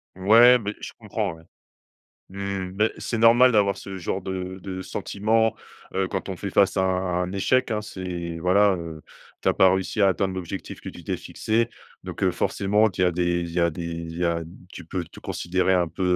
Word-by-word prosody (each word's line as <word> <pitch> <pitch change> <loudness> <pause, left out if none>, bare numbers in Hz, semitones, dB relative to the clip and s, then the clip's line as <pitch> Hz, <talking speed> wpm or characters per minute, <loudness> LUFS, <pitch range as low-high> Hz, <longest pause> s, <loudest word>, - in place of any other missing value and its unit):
Ouais, 115 +6 +7
beh, 105 -1 -4
je - - -6
comprends, - - -3
ouais. 80 - -17 0.9
Mmh, 100 -1 -4
mais, 105 +2 +2
c'est - - -3
normal 120 +3 +6
d'avoir 100 -2 +3
ce 95 -1 -7
genre 95 +1 -3
de 95 0 -5
de 95 0 -6
sentiment, 110 +4 0 0.4
heu, 95 -1 0
quand 95 0 -4
on 95 - -4
fait 100 - -5
face 100 +1 +3
à 95 - +3
un 90 -1 0
un 90 +1 -4
échec, 125 +6 +1
hein. 105 -1 0
C'est, 90 -5 -5
voilà, 95 +3 +4
heu, 80 -3 -7 0.4
tu - - 0
as - - +3
pas 95 -1 +5
réussi 95 +2 -1
à 100 - +6
atteindre 95 +1 0
l'objectif 90 -3 -6
que - - -8
tu - - -10
t'es - - -2
fixé. 115 +2 -1 0.4
Donc, - - -7
heu, - - +4
forcément, 105 +2 +1
tu 90 - -2
as 90 - +2
des 85 0 0
il 85 - -4
y 90 - 0
a 85 0 +3
des 85 +1 -6
il 85 0 -6
y 90 - 0
a 85 -1 0 0.3
tu 90 - -9
peux 90 +1 -4
te - - -14
considérer 95 +2 0
un 90 -2 +2
peu, 95 - -6
95 Hz, 215 wpm, -24 LUFS, 90-100 Hz, 0.9 s, Ouais